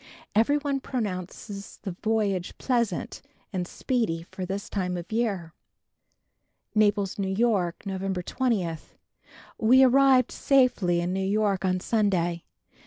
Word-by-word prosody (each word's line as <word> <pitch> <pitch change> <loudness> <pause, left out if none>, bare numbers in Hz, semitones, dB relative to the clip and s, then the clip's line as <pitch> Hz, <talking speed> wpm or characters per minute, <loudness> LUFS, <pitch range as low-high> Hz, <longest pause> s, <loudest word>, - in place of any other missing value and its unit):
Every 230 +7 +3
one 285 -2 -1
pronounces 200 -4 -5
the 195 - -3
voyage 200 -1 -1
pleasant 235 -8 -1 0.3
and 180 -2 -2
speedy 220 -12 -1
for 185 +1 -7
this 195 +2 -4
time 180 -3 -2
of 175 +3 -8
year. 200 -8 -1 1.2
Naples, 205 -2 +2
N. 190 -1 -1
Y., 210 -7 +2
November 190 -1 -3
20. 195 -9 -1 0.8
We 255 +4 +6
arrived 260 -1 +5
safely 230 -11 +2
in 175 +1 -2
New 190 - -1
York 200 -1 +1
on 185 -1 +1
Sunday. 180 -6 0
200 Hz, 120 wpm, -26 LUFS, 185-235 Hz, 1.2 s, We